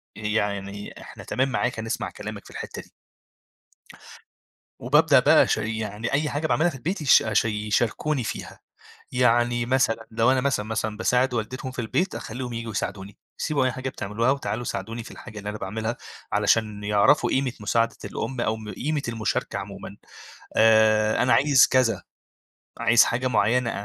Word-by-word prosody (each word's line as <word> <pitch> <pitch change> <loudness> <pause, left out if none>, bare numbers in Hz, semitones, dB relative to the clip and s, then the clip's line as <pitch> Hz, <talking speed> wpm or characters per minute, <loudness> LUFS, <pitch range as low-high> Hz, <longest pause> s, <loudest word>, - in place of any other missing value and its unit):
يعني، 100 -2 -3
إحنا - - -11
تمام 130 +1 0
معاك، 125 -2 -1
هنسمع 110 0 -3
كلامك - - -8
في - - -13
الحتة - - -7
دي. - - -21 1.9
وبابدأ - - +4
بقى - - +6
أشا - - +1
يعني 110 +1 -3
أي 150 +2 +1
حاجة 150 +2 -1
باعملها 160 +2 +2
في 145 - -9
البيت 165 +10 -3
يش 140 - +6
أش 110 0 +1
يشاركوني 115 +6 -1
فيها. - - -6 0.5
يعني 120 -1 +2
مثلًا 115 -3 +1
لو 115 +3 +3
أنا 130 - +2
مثلًا، 130 -6 0
مثلًا، 110 -1 -2
باساعد 125 +3 +1
والدتهم 125 +3 -4
في 130 - -14
البيت، 125 - -1
أخلّيهم 125 +2 -6
ييجوا 115 -1 -5
يساعدوني، 100 0 -5 0.2
سيبوا 145 -4 0
أي 130 - +1
حاجة 130 +1 -4
بتعملوها 115 +1 -1
وتعالوا 125 -4 -2
ساعدوني 115 +2 -5
في - - -11
الحاجة 110 -3 -10
اللي 105 0 -5
أنا 105 - -6
باعملها، 110 +4 -3 0.4
علشان 105 -2 +1
يعرفوا 105 +7 +3
قيمة 130 -1 0
مساعدة 115 +2 0
الأم 130 -2 -4
أو 110 -1 0
م 110 -1 -8
قيمة 150 +1 -2
المشاركة 115 -2 -2
عمومًا. - - -8 0.6
آآ، 110 0 +4
أنا 125 - +3
عايز 140 -1 +6
كذا، 125 -6 +2 0.8
عايز 115 0 +5
حاجة 125 +2 -1
معينة، 115 +1 +2
115 Hz, 160 wpm, -24 LUFS, 110-130 Hz, 1.9 s, بقى